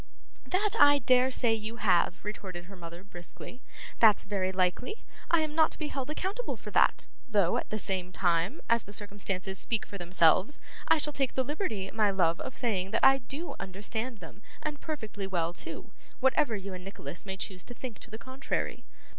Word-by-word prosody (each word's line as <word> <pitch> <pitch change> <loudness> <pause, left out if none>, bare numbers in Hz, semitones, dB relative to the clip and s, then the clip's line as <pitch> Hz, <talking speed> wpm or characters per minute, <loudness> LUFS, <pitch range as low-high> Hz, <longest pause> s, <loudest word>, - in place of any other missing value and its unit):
'That 400 +3 +1
I 290 0 +8
dare 255 0 +4
say 240 -3 +3
you 220 +1 -4
have,' 185 -4 +2
retorted 185 -4 -6
her 195 +2 -11
mother, 170 0 -9
briskly. 200 +6 -11 0.4
'That's 220 -3 +6
very 190 -2 -1
likely. 185 - 0 0.3
I 335 -1 +4
am 310 -1 -2
not 315 0 +5
to - - -6
be 305 -2 -3
held 270 0 -4
accountable 390 +10 -3
for - - -9
that; - - +3 0.2
though, 200 -6 +3
at - - -3
the 215 - -2
same 185 -3 -1
time, 175 - +1
as 230 0 +3
the 205 - -10
circumstances 195 -2 -3
speak 225 -3 0
for 200 - -8
themselves, 175 - +3 0.3
I - - +6
shall 295 0 +1
take 270 -2 -1
the 260 - +2
liberty, 225 - -2
my 215 -2 +3
love, 170 -4 +2
of 260 - -6
saying 195 -6 0
that 215 - +2
I 270 0 +7
do 280 +7 -5
understand 215 +4 -3
them, 175 +4 -11 0.2
and 300 -2 -4
perfectly 220 -10 -4
well 170 -3 -1
too; - - -7 0.3
whatever 265 -2 +3
you 195 -1 -5
and 180 0 -7
Nicholas 180 -4 -7
may 190 -1 -5
choose 190 -2 -5
to 245 - -9
think 240 -3 -7
to - - -8
the 220 - -7
contrary. 260 +3 -3
210 Hz, 195 wpm, -30 LUFS, 185-260 Hz, 0.4 s, I